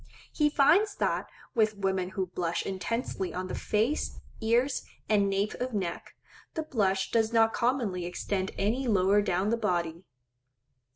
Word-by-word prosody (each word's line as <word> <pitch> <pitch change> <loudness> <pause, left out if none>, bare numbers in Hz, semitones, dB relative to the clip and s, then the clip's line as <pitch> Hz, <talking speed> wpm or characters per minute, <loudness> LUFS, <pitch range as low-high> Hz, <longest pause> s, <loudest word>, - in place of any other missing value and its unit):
He 300 -1 +3
finds 355 +9 +4
that - - -1 0.2
with 215 -2 +2
women 190 -2 0
who 190 - +1
blush 175 -2 -2
intensely 195 0 -3
on 185 0 -3
the - - -4
face, 225 +8 0 0.2
ears, 240 +4 +2 0.3
and 200 -2 +3
nape 195 +2 0
of 250 -2 -2
neck, 180 -4 -4 0.4
the 320 - -1
blush 195 -9 0
does 225 -1 +2
not 225 -1 +4
commonly 235 -8 0
extend 190 +2 -2
any 235 +7 0
lower 200 -1 +4
down 195 +1 0
the 230 - +2
body. 175 -5 -1
210 Hz, 150 wpm, -29 LUFS, 190-235 Hz, 0.4 s, finds